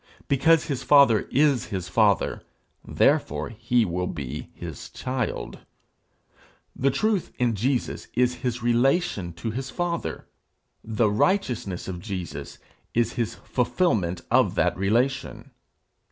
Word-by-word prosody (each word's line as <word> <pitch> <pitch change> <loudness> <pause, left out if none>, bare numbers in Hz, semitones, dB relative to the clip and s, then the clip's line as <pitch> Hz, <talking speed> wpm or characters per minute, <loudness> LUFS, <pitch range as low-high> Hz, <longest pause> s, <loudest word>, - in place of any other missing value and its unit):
Because 155 +4 +4
his 140 -5 -3
father 140 -7 +5
is 140 -3 +3
his 95 -4 -4
father, 100 +2 +2 0.4
therefore - - +1
he 115 +1 +1
will 90 0 -2
be 70 +2 -6
his - - -8
child. 130 -2 -4 1.2
The 135 - +2
truth 195 +8 0
in 120 -2 +1
Jesus 120 +5 -1
is 125 +1 +2
his 120 -2 -2
relation 120 - +1
to 85 +7 -4
his 130 +4 -4
father; 175 +3 -3 0.6
the 110 -1 +1
righteousness 115 - 0
of 90 -2 -5
Jesus 95 -3 -6 0.4
is 115 0 +2
his 115 -4 -2
fulfilment 110 - 0
of - - +3
that - - +2
relation. 120 +8 -1
120 Hz, 120 wpm, -25 LUFS, 100-135 Hz, 1.2 s, father